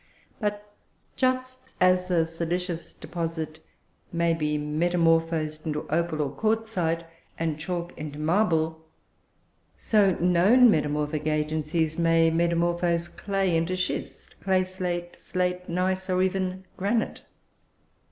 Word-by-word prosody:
But 210 -1 -3 0.4
just 255 0 0 0.2
as 185 0 +3
a 170 -3 +3
silicious 170 +1 -3
deposit 165 -2 -5 0.5
may 170 0 +2
be 150 -2 0
metamorphosed 165 0 +1
into 150 -1 -3
opal 160 -2 0
or 140 - -3
quartzite, 215 -6 0 0.3
and 160 -2 -2
chalk 175 +1 -4
into 150 -1 -6
marble, 160 -1 +1 0.9
so 200 -4 +3
known 190 +8 +5
metamorphic 150 -1 0
agencies 155 +1 0
may 165 -1 +4
metamorphose 170 0 +1
clay 195 -3 -1
into 165 +3 +1
schist, 185 - -4
clay 190 -1 +2
slate, 180 -2 -4
slate, 180 0 -2
gneiss, 185 +2 -1
or 185 0 +2
even 185 0 -1
granite. 215 +4 -1
170 Hz, 110 wpm, -26 LUFS, 160-185 Hz, 0.9 s, known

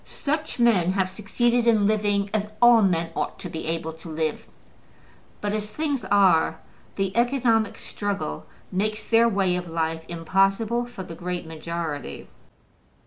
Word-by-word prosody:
Such 300 +2 -3
men 200 -7 +3
have 190 -1 0
succeeded 235 +4 +1
in 220 -3 +4
living 205 -1 +1
as 210 -1 0
all 240 -1 +7
men 170 -4 +1
ought - - -2
to - - -7
be 160 - -6
able 160 0 -2
to 160 +1 -11
live; 155 -1 -2 0.9
but 205 0 -1
as 210 0 -3
things 290 -6 -2
are, 185 -5 +4 0.4
the 195 0 -2
economic 235 -3 +2
struggle 200 - -4 0.2
makes 215 +3 -1
their 230 0 +4
way 195 -4 +1
of 180 -1 -4
life 160 0 -2
impossible 195 +8 +1
for 220 -6 -8
the 175 - -9
great 180 +1 -4
majority. 160 -1 -5
195 Hz, 145 wpm, -25 LUFS, 170-225 Hz, 0.9 s, all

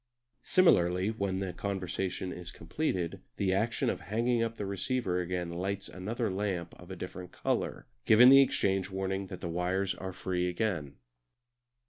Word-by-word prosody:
Similarly, 90 - +4
when 100 -4 -2
the 95 -2 -3
conversation 95 -1 -3
is 90 -1 -8
completed 90 - -3 0.2
the 95 -2 +1
action 110 +4 0
of - - -1
hanging 115 +3 0
up 115 0 -1
the 100 - -3
receiver 100 -1 -1
again 90 -1 -3
lights 95 +3 -3
another 110 +4 -3
lamp 95 -3 -2
of 90 - -13
a 95 - -5
different 90 0 -7
colour, - - -2 0.2
given 120 +4 +8
the 135 +1 +9
exchange 95 -7 +1
warning 95 0 -2
that - - -8
the - - -3
wires 90 +3 0
are 95 0 -6
free 90 -1 -1
again. 85 -7 -2
95 Hz, 155 wpm, -31 LUFS, 90-105 Hz, 0.2 s, the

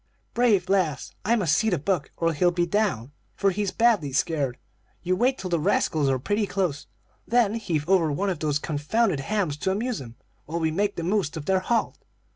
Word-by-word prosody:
"'Brave 220 -7 +3
lass! 180 -8 0
I 230 +4 +3
must 175 -9 +2
see 220 +5 +2
to 180 - +1
Buck 155 -1 -1
or 165 0 +1
he'll 175 +4 +3
be 175 0 0
down, 170 - -1 0.2
for 200 -1 +2
he's 200 +1 -1
badly 220 -12 +2
scared. 140 -2 0 0.5
You 185 +1 +1
wait 255 +7 +2
till 185 -1 -6
the 170 - +2
rascals 150 -1 +1
are 135 - +2
pretty 205 - -1
close, 180 -7 -2 0.4
then 235 -3 +3
heave 165 -9 -2
over 175 -5 +3
one 195 +7 0
of 175 - -4
these 150 -2 0
confounded 155 +5 0
hams 180 -2 -1
to 190 - -1
amuse 225 - -1
'em, 115 -2 -10 0.3
while 165 +3 -3
we 160 -1 0
make 200 +5 0
the 170 - -4
most 180 -4 0
of 150 - -6
their 190 +2 +2
halt. 230 +5 -1
180 Hz, 205 wpm, -25 LUFS, 150-205 Hz, 0.5 s, Brave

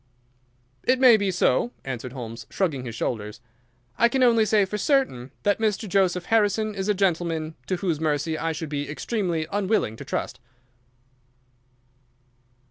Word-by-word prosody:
"It 255 0 +2
may 255 -3 +8
be 200 -2 0
so," 125 -9 +1
answered 125 -1 -5
Holmes, 115 -3 -8
shrugging 150 -10 -1
his 115 -2 -6
shoulders. 105 -1 -3 0.6
"I 235 - +5
can 265 +1 +1
only 230 -3 +5
say 210 -1 +3
for 210 +2 -4
certain 200 - +1
that 205 +1 +2
Mr. 215 -1 0
Joseph 180 -2 +1
Harrison 215 -1 +2
is 195 0 -3
a 210 - +3
gentleman 170 -4 0
to 185 - 0
whose 175 -4 -1
mercy 155 0 0
I 165 +1 -1
should 160 -1 -5
be 145 -1 -3
extremely 170 0 -2
unwilling 200 - 0
to - - -8
trust." 125 - -4
180 Hz, 150 wpm, -25 LUFS, 145-210 Hz, 0.6 s, may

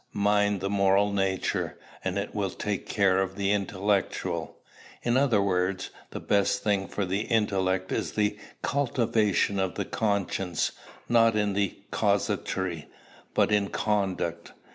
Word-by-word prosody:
Mind 105 -1 +2
the 100 - -1
moral 100 +1 +3
nature, 95 -1 -1 0.3
and 95 +1 -1
it 100 +1 -3
will 100 -2 -1
take 100 +2 -3
care 95 -2 +3
of 95 0 -1
the 100 0 0
intellectual. 100 -1 -1 0.5
In 120 0 +1
other 125 -7 +3
words, 95 -1 0 0.2
the - - -6
best 100 -1 +1
thing 100 -2 +1
for 100 - -2
the 95 +2 -1
intellect 95 -5 0
is - - -2
the 105 -1 +1 0.3
cultivation 115 -7 +1
of 95 -1 -1
the 100 - -2
conscience, 100 -5 -1 0.4
not 115 -1 +4
in 105 -1 +1 0.4
casuistry, 85 -5 0 0.5
but - - +3
in 105 -1 +3
conduct. 95 -5 -1
100 Hz, 135 wpm, -27 LUFS, 95-105 Hz, 0.5 s, not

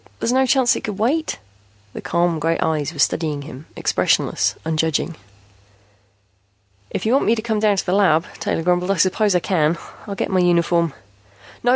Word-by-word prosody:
There's 230 - 0
no 265 0 +3
chance 255 -1 +3
it - - -5
could 210 -3 -4
wait?" 280 +10 0 0.6
The - - -7
calm 170 -1 0
gray 165 +2 0
eyes 155 -2 -1
were 165 - -12
studying 150 0 0
him, 140 0 -11
expressionless, - - +1
unjudging. 160 +1 0 1.8
"If - - -4
you 225 - +2
want 275 - +3
me 225 - +3
to 220 - -4
come 220 -2 -1
down 210 -2 +2
to - - -1
the 180 - 0
lab," 175 -5 +3
Taylor 165 - -2
grumbled, 180 +1 +1
"I 195 - +2
suppose 190 +3 +2
I - - +4
can. 165 -2 +1 0.3
I'll 200 - -4
get - - -3
my 185 - +2
uniform 170 -3 +2 0.3
" 100 0 -23
"No. 245 - +1
175 Hz, 190 wpm, -20 LUFS, 160-210 Hz, 1.8 s, I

